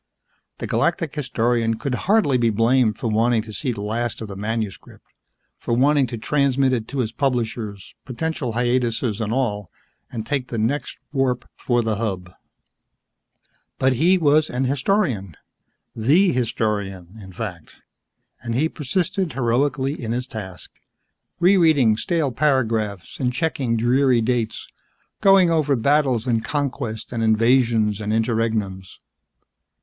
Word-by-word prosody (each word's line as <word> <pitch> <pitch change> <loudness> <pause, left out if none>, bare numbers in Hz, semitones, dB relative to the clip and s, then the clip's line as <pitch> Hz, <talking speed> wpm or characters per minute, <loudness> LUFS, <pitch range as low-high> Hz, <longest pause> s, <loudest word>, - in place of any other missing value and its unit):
The - - -5
Galactic 165 -6 0
Historian 120 -5 0
could 125 +4 -4
hardly 180 - +2
be 115 -1 +3
blamed 115 0 +2
for - - -3
wanting 115 +1 +2
to 110 -1 -10
see 130 +4 -2
the 105 -4 -5
last 115 +2 -2
of 110 - -6
the 100 - -7
manuscript, 105 0 -5 0.5
for 115 - -1
wanting 140 +2 +3
to 120 - -5
transmit 135 +1 +1
it 115 -3 -2
to 140 - -6
his 110 -2 -2
publishers, 115 -6 -3
potential 130 -1 -3
hiatuses 120 -2 0
and 110 -1 -2
all, 105 -7 -1 0.4
and 110 -3 -5
take 135 -2 -2
the 115 - -5
next 130 +5 -1 0.2
warp 130 -3 0
for 120 -1 0
the 110 -2 -1
Hub. 95 -5 -4 1.4
But 130 0 +2
he 170 +9 +3
was 155 -2 +3
an 125 +2 -1
historian 130 - 0 0.6
the 155 - +3
historian, 105 -5 -2
in 95 -1 -11
fact 90 - -7 0.7
and 115 -1 -4
he 155 +6 +1
persisted 180 - -2
heroically 135 +2 0
in 115 0 -2
his 125 +1 -2
task, 95 -7 -8 0.7
rereading 160 - +4
stale 160 0 0
paragraphs 115 - -1
and 125 -2 0
checking 130 -5 -1
dreary 125 +2 +3
dates, 115 -2 -1 0.5
going 195 -3 +5
over 150 -4 +2
battles 130 -1 +2
and 115 -3 0
conquests 120 -4 -3
and 120 -2 -3
invasions 115 -1 +2
and 105 0 -2
interregnums. 110 -5 -1
120 Hz, 135 wpm, -22 LUFS, 110-140 Hz, 1.4 s, going